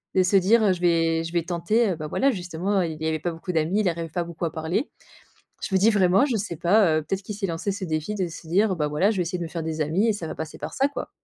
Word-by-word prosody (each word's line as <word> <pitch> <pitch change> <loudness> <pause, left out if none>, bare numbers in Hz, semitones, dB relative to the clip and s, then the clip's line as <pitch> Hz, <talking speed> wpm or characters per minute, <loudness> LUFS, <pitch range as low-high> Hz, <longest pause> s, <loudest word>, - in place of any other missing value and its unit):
de 185 - +5
se 185 +2 +1
dire: 205 +5 +5
"heu, 190 - +4
je 180 - -7
vais 165 -1 +2
je 165 - -6
vais 170 -2 0
tenter"» 185 +6 +1
heu, - - -1
bah 155 -1 -6
voilà 275 - +2
justement, 185 0 -1
il 160 -2 -4
avait 160 0 0
pas 175 +3 -2
beaucoup 165 +3 -6
d'amis, 165 +6 +1
il 195 - 0
arrivait 165 -1 -4
pas 170 +2 -2
beaucoup 170 0 -8
à 165 - -2
parler, 165 - -2 0.7
je 190 - -3
me 190 - +4
dis 215 - +5
vraiment: 195 +3 +4
«Je 230 - +1
sais 195 -5 -3
pas 170 -1 +3
heu, - - -2
peut-être, 190 +6 -3
qu'il 210 - -6
s'est 200 0 -2
lancé 170 +3 -2
ce 195 0 -5
défi 155 +6 -2
de 190 -4 -1
se 165 0 -10
dire: 195 +2 +2
"Bah 150 -2 0
voilà 165 +8 +2
je 215 - -2
vais 180 - +1
essayer 180 +2 -3
de 175 - -3
me 165 - -5
faire 165 -1 -5
des 160 -1 -3
amis 165 +9 +1
et 220 - +4
ça 190 -5 -5
va - - -5
passer 160 -1 -6
par - - -6
ça 275 - +2
quoi"». 285 - -6
175 Hz, 310 wpm, -24 LUFS, 165-200 Hz, 0.7 s, de